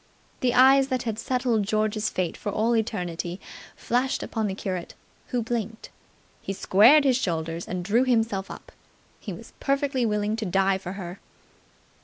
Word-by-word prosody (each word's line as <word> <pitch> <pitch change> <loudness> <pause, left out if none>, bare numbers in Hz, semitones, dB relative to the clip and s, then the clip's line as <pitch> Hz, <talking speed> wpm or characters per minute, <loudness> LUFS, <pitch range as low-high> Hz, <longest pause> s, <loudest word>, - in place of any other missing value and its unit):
The 245 -1 +1
eyes 265 +2 +6
that 255 -2 -1
had 225 -2 -3
settled 250 -3 0
George's 215 0 0
fate 180 -3 -2
for 205 - -4
all 225 +4 +1
eternity 180 -5 -2 0.4
flashed 250 +3 -1
upon 220 -2 -2
the 190 - -3
curate, 185 -3 -5 0.3
who 245 -2 -1
blinked. 225 -1 -4 0.5
He 195 - -4
squared 220 +10 +6
his 260 -3 +3
shoulders 165 -6 -3
and 180 -1 -4
drew 225 +6 +3
himself 225 -6 0
up. - - -10 0.5
He - - -7
was - - -10
perfectly 275 -2 0
willing 210 0 0
to 225 - -3
die 195 +1 +2
for 185 -1 -6
her. 185 0 -7
215 Hz, 160 wpm, -25 LUFS, 190-245 Hz, 0.5 s, eyes